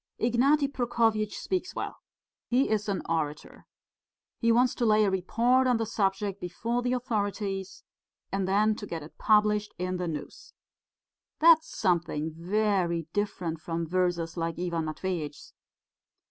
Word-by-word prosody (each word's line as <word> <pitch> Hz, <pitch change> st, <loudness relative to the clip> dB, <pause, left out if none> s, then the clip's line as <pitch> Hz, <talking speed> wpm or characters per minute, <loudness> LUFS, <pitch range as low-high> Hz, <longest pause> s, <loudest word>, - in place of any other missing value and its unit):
Ignaty 275 Hz, +5 st, +3 dB
Prokofyitch 230 Hz, -5 st, 0 dB
speaks 370 Hz, 0 st, -3 dB
well. -, -, -4 dB, 0.5 s
He 255 Hz, +3 st, +2 dB
is 210 Hz, -1 st, 0 dB
an 195 Hz, -, -1 dB
orator. 155 Hz, -3 st, -3 dB, 0.7 s
He 230 Hz, -1 st, +3 dB
wants 245 Hz, +2 st, +4 dB
to 240 Hz, -, -1 dB
lay 215 Hz, 0 st, +5 dB
a 195 Hz, -, +1 dB
report 235 Hz, +8 st, +2 dB
on 250 Hz, -2 st, +3 dB
the 225 Hz, -, -1 dB
subject 200 Hz, -2 st, -1 dB
before 230 Hz, +7 st, -2 dB
the 245 Hz, +1 st, 0 dB
authorities, 205 Hz, -5 st, -2 dB, 0.5 s
and 195 Hz, -1 st, -1 dB
then 210 Hz, +3 st, +3 dB
to 205 Hz, -, -7 dB
get 165 Hz, -3 st, -5 dB
it 150 Hz, -, -14 dB
published 210 Hz, -1 st, +3 dB
in 180 Hz, +1 st, -2 dB
the 180 Hz, -1 st, -2 dB
News. 155 Hz, -3 st, -7 dB, 0.8 s
That's 320 Hz, 0 st, +5 dB
something 165 Hz, -4 st, 0 dB
very 180 Hz, -2 st, 0 dB
different 180 Hz, -6 st, -2 dB
from 165 Hz, 0 st, -3 dB
verses 175 Hz, -1 st, 0 dB
like 165 Hz, -1 st, -2 dB
Ivan 170 Hz, -2 st, -2 dB
Matveitch's...." 155 Hz, -2 st, -4 dB
200 Hz, 140 wpm, -28 LUFS, 170-230 Hz, 0.8 s, lay